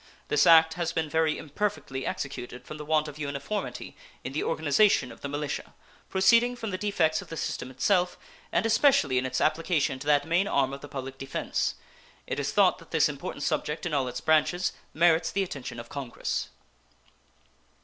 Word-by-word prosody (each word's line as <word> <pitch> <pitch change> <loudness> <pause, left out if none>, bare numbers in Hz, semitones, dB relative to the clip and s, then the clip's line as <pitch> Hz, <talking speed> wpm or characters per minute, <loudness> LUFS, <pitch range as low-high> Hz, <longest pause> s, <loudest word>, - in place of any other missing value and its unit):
This 150 -1 +4
act 160 -1 +7
has 170 0 -2
been 160 -2 -1
very 160 -1 +2
imperfectly 150 -5 -3
executed 125 -2 -5
from 155 - -8
the 150 - -7
want 155 0 +2
of 150 0 -9
uniformity 140 +8 -4 0.3
in 130 - -5
the 150 - -1
organization 160 -2 +2
of - - -14
the 140 - -4
militia, 145 0 -4 0.3
proceeding 230 +6 +4
from 225 -4 -5
the 185 - -2
defects 180 -6 +1
of - - -12
the 165 - -7
system 130 - -3
itself, 180 +7 +1 0.3
and - - +1
especially 220 - +4
in 130 - -2
its - - -2
application 155 -5 +1
to 145 - -8
that 145 -1 +4
main 175 +4 +2
arm 135 -7 +1
of 140 - -7
the - - -8
public 135 0 -6
defense. 135 0 -2 0.5
It - - -3
is - - -1
thought - - +4
that - - -16
this - - +3
important - - -6
subject 150 +2 -1
in 170 - -2
all 135 -3 +1
its 125 0 -5
branches 155 +6 +2 0.2
merits 165 0 +3
the 195 - +1
attention 130 -8 -6
of 120 - -8
Congress. 135 -4 -4
155 Hz, 185 wpm, -27 LUFS, 140-175 Hz, 0.5 s, act